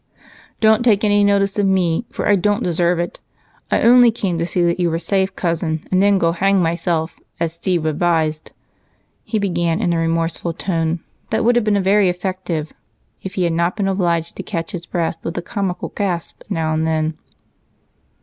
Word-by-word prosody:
"Don't 220 Hz, 0 st, +4 dB
take 225 Hz, -4 st, +3 dB
any 205 Hz, -1 st, +3 dB
notice 200 Hz, 0 st, +2 dB
of 200 Hz, -, +2 dB
me, 190 Hz, +2 st, +1 dB
for -, -, -3 dB
I 205 Hz, -, +5 dB
don't 205 Hz, +4 st, +1 dB
deserve 175 Hz, 0 st, +1 dB
it. 175 Hz, +1 st, -4 dB, 0.5 s
I -, -, +1 dB
only 245 Hz, +1 st, +7 dB
came 195 Hz, -7 st, -2 dB
to 170 Hz, -, -1 dB
see 175 Hz, 0 st, 0 dB
that 170 Hz, +1 st, +1 dB
you 175 Hz, -1 st, +2 dB
were 165 Hz, -, -1 dB
safe, 190 Hz, +3 st, 0 dB
Cousin, 165 Hz, -2 st, -2 dB
and 185 Hz, 0 st, +3 dB
then 200 Hz, 0 st, +4 dB
go 165 Hz, -3 st, +2 dB
hang 195 Hz, +3 st, +2 dB
myself, 165 Hz, -1 st, -1 dB, 0.2 s
as 165 Hz, -1 st, -1 dB
Steve 170 Hz, -1 st, -1 dB
advised," 155 Hz, -1 st, 0 dB, 0.7 s
he 220 Hz, -, -2 dB
began 175 Hz, -5 st, 0 dB
in 175 Hz, -, +1 dB
a 165 Hz, -, 0 dB
remorseful 165 Hz, +1 st, -1 dB
tone 165 Hz, -2 st, -2 dB, 0.3 s
that 220 Hz, -, 0 dB
would 240 Hz, +1 st, +4 dB
have 240 Hz, -, +3 dB
been 205 Hz, -2 st, +2 dB
very 195 Hz, 0 st, +4 dB
effective 180 Hz, -3 st, -3 dB, 0.5 s
if 190 Hz, +1 st, -7 dB
he 185 Hz, -, 0 dB
had 170 Hz, -1 st, +1 dB
not 170 Hz, +2 st, 0 dB
been 200 Hz, -2 st, -1 dB
obliged 170 Hz, -4 st, 0 dB
to -, -, -3 dB
catch 165 Hz, -1 st, -4 dB
his 170 Hz, -1 st, -6 dB
breath 170 Hz, -3 st, -2 dB
with 165 Hz, -, -5 dB
a -, -, -1 dB
comical 190 Hz, -3 st, -3 dB
gasp 180 Hz, -5 st, -3 dB
now 160 Hz, -1 st, -1 dB
and 160 Hz, +1 st, 0 dB
then. 155 Hz, 0 st, 0 dB
175 Hz, 190 wpm, -19 LUFS, 165-200 Hz, 0.7 s, only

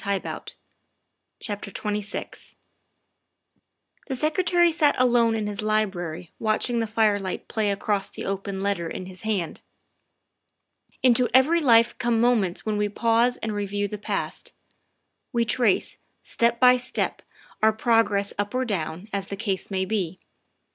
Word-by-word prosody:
THE -, -, -9 dB
SECRETARY 200 Hz, -1 st, -1 dB
OF -, -, -18 dB
STATE 205 Hz, -3 st, -4 dB
253 210 Hz, +1 st, -3 dB
XXVI -, -, -13 dB, 1.5 s
THE 270 Hz, -, -2 dB
Secretary 345 Hz, +5 st, +2 dB
sat 310 Hz, -3 st, +3 dB
alone 240 Hz, -2 st, +3 dB
in 215 Hz, -1 st, -2 dB
his 210 Hz, 0 st, -4 dB
library 180 Hz, -6 st, -2 dB
watching 225 Hz, +2 st, 0 dB
the 225 Hz, -, -1 dB
firelight 210 Hz, -3 st, 0 dB
play 215 Hz, -2 st, 0 dB
across 200 Hz, 0 st, -1 dB
the -, -, -7 dB
open 195 Hz, 0 st, -3 dB
letter 195 Hz, -4 st, -1 dB
in 185 Hz, -, -6 dB
his 185 Hz, 0 st, -10 dB
hand. 205 Hz, -6 st, -2 dB, 1.4 s
Into 250 Hz, -1 st, +4 dB
every 315 Hz, +6 st, +5 dB
life 235 Hz, -4 st, +5 dB
come 240 Hz, -2 st, +1 dB
moments 225 Hz, -7 st, +1 dB
when 215 Hz, -1 st, -1 dB
we 210 Hz, 0 st, 0 dB
pause 230 Hz, +3 st, +2 dB
and 220 Hz, -1 st, -2 dB
re 205 Hz, -1 st, -2 dB
view 205 Hz, +1 st, -1 dB
the 210 Hz, +1 st, -6 dB
past. -, -, -4 dB, 0.8 s
We 235 Hz, -2 st, +1 dB
trace, 230 Hz, -4 st, +1 dB, 0.3 s
step 235 Hz, 0 st, +1 dB
by 250 Hz, 0 st, +7 dB
step, 250 Hz, +1 st, -2 dB, 0.4 s
our 220 Hz, 0 st, +5 dB
progress 220 Hz, -3 st, +1 dB
up 205 Hz, +4 st, -2 dB
or 260 Hz, 0 st, +1 dB
down, 180 Hz, -3 st, -3 dB
as 195 Hz, -1 st, -2 dB
the 200 Hz, -, -5 dB
case 195 Hz, -2 st, -2 dB
may 190 Hz, -1 st, -1 dB
be. 190 Hz, -4 st, -2 dB
215 Hz, 150 wpm, -25 LUFS, 200-235 Hz, 1.5 s, by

